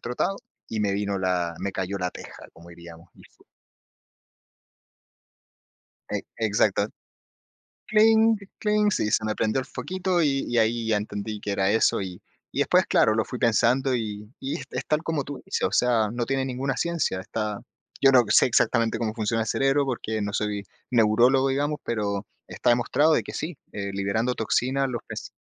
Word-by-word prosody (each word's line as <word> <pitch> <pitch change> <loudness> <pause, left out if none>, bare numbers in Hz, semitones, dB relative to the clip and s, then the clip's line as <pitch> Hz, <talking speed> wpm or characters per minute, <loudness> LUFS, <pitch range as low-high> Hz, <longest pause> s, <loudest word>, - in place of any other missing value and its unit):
trotado, 125 +11 -2 0.3
y 110 - -4
me 100 -1 +1
vino 100 -1 -1
la 90 -2 0
me 100 - -3
cayó 95 +1 -3
la 90 -1 -1
teja, - - -11
como 85 +1 -16
diríamos. 85 0 -13
Ujú. - - -21 2.7
E - - -2 0.2
exacto. 105 -2 +2 1.0
Cling, 220 +1 +5 0.2
cling, 210 0 +2
sí, 105 - 0
se - - +2
me 110 0 -1
prendió 110 +4 0
el 130 - -4
foquito, 185 -1 -2
y 140 -3 +1
y 120 - -1
ahí 115 0 +1
ya 110 - +2
entendí 105 0 -5
que 105 - -4
era 95 -1 +1
eso. 110 -2 +2
Y 90 -2 -7 0.3
y - - -4
después, - - +3
claro, 110 - +3
lo 110 0 +1
fui 125 - -6
pensando 125 +3 +2
y 105 -2 -4
y 135 - -3
es 125 0 -4
tal 155 +1 +1
como 160 -4 -1
tú 140 0 -8
dices. - - -2
O - - -8
sea, 115 -3 +2
no 120 0 -2
tiene 135 0 -1
ninguna 130 +1 -2
ciencia. 170 - -1
Está 105 +2 -4 0.4
yo 135 -1 +7
no 125 -2 +6
sé - - +6
exactamente 115 -1 +2
cómo 110 -2 -2
funciona 115 0 -1
el - - -8
cerebro, 135 +4 +2
porque 110 -4 -3
no 100 0 -3
soy 105 -1 -2 0.3
neurólogo, 125 +4 +4
digamos, 145 +2 -1
pero 105 -3 -2 0.2
está - - -1
demostrado 140 +6 +3
que - - -8
sí, 155 0 -4
eh, 100 -1 -4
liberando 100 +5 0
toxinas, 130 +4 0
los 120 - -4
ves. - - -7
115 Hz, 175 wpm, -25 LUFS, 105-135 Hz, 2.7 s, yo